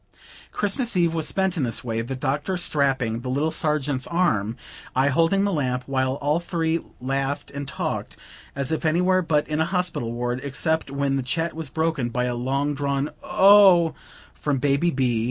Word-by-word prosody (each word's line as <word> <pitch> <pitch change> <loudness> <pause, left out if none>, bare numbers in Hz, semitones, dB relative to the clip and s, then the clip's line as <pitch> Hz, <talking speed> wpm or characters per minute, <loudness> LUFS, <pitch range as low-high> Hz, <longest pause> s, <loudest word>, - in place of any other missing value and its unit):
Christmas 220 +1 0
eve 170 -2 +2
was 160 -2 0
spent 190 -1 0
in 165 - -1
this 120 -4 -1
way; 115 -2 -2
the 125 +4 -5
Doctor 145 +7 -2
strapping 135 -8 +1
the 125 +1 -6
little 145 +5 0
Sergeant's 145 -4 -1
arm, 115 - 0 0.4
I 135 +2 +3
holding 165 +7 +2
the 200 -1 0
lamp, 125 -5 -1
while 130 -1 0
all 145 +3 0
three 165 -1 -1 0.2
laughed 135 +2 -2
and 140 0 -6
talked, 140 - -4 0.4
as 140 0 -1
if 160 - -1
anywhere 180 +4 +2
but 155 -3 0
in 155 0 -2
a - - +2
hospital 180 -10 -2
ward; 120 +1 -2
except 160 +3 -1
when 140 0 -1
the - - 0
chat 165 +6 -2
was 160 -3 -6
broken 160 -6 -1
by 125 +1 -1
a 125 - -1
long 135 +4 -1
drawn 140 0 -1
"Oh!" 190 -4 +6 0.4
from 145 -2 -1
"Baby 140 +5 +2
B. 130 -6 0
145 Hz, 180 wpm, -24 LUFS, 130-165 Hz, 0.4 s, Oh